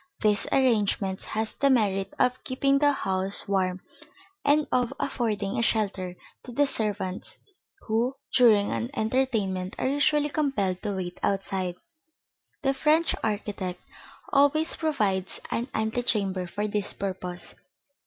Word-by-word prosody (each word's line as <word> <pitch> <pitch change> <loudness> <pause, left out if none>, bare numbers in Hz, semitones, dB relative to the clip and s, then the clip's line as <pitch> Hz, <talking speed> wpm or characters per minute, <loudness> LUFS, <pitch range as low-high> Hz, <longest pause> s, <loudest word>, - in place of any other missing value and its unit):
This 210 0 +2
arrangement 210 -7 +2
has 220 0 -2
the 280 - +2
merit 200 -6 +2
of 250 0 +1
keeping 275 +2 +2
the 290 0 +4
house 190 -6 +1
warm 185 -2 0 0.6
and 295 +1 +3
of 250 -2 +2
affording 215 -6 -1
a - - +2
shelter 200 -5 0 0.3
to 250 - -10
the 285 +4 +3
servants 205 -7 -3 0.4
who, 235 +4 0 0.2
during 220 -5 +5
an 115 0 -2
entertainment, 215 -6 0
are - - 0
usually 290 +2 +2
compelled 265 -12 0
to 205 -2 -2
wait 180 -1 -5
outside. 190 -2 -1 0.9
The 270 -1 +2
French 310 +4 +3
architect 205 -4 -2 0.5
always 290 +3 +3
provides 210 - 0
an 235 +2 -1
antechamber 215 -5 0
for 205 +4 -2
this 205 -1 -2
purpose. 185 -2 -3
215 Hz, 125 wpm, -27 LUFS, 190-265 Hz, 0.9 s, during